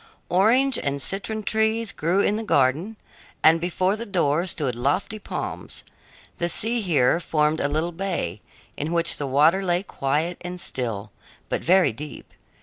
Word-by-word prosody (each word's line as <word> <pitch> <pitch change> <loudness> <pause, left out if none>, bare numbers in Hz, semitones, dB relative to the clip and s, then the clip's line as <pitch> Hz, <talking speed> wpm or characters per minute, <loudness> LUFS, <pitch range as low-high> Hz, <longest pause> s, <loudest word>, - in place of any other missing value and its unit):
Orange 230 +8 +3
and 140 0 -2
citron 210 +8 -2
trees 220 +1 +1
grew 175 +5 +1
in 205 - +2
the 220 - -3
garden, 155 +4 +1 0.5
and 165 +1 +6
before 185 +3 0
the 225 - -5
door 175 -5 +1
stood 145 -7 -1
lofty 145 - -1
palms. - - -5 0.6
The 170 - 0
sea 230 +6 0
here 160 -5 +3
formed 155 -2 +1
a - - +1
little 155 +4 -1
bay, 170 - -3 0.3
in 155 +4 -3
which 170 0 +2
the 145 - -3
water 155 +8 +4
lay 175 0 +1
quiet 155 +1 -2
and 180 0 -6
still, 115 - -3 0.4
but - - -1
very 180 -8 +4
deep. 150 +6 -9
170 Hz, 155 wpm, -24 LUFS, 145-195 Hz, 0.6 s, and